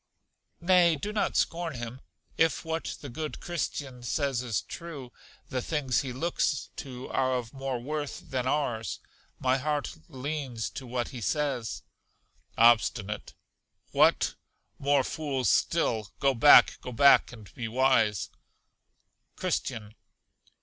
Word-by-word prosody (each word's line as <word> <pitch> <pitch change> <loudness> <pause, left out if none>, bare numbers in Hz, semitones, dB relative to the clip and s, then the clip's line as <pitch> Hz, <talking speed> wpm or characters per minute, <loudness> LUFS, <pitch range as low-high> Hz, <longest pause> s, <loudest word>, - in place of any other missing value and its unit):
Nay, 175 -2 +5
do 205 +9 -5
not 210 - 0
scorn 165 -3 0
him; 120 +2 -6 0.3
if 165 0 +2
what 160 0 -3
the 145 - -7
good 150 +4 -5
Christian 145 -7 -4
says 135 +1 -1
is 120 -5 -2
true, 150 -8 -8 0.4
the 130 -1 -2
things 140 -3 0
he 135 - -5
looks 145 +1 -1
to 130 -2 -7
are 130 -1 +1
of 120 -2 -4
more 135 -2 -3
worth 145 +3 -5
than 130 -1 -1
ours: 120 -6 -1 0.4
my 130 +1 +1
heart 145 +1 -2
leans 135 -3 -4
to 130 - -8
what 120 -1 -2
he 125 - -8
says. 140 -4 -1 0.7
Obstinate. 110 -2 +3 0.6
What! - - +4 0.5
more 140 -1 +3
fools 135 -5 -1
still! 115 - +1
Go 140 -1 +3
back, 130 +4 +7
go 125 - -6
back, 140 +4 +6
and 110 -6 -13
be 120 - -4
wise. 115 -5 +2 1.1
Christian. 105 -1 -3
130 Hz, 130 wpm, -28 LUFS, 120-150 Hz, 1.1 s, back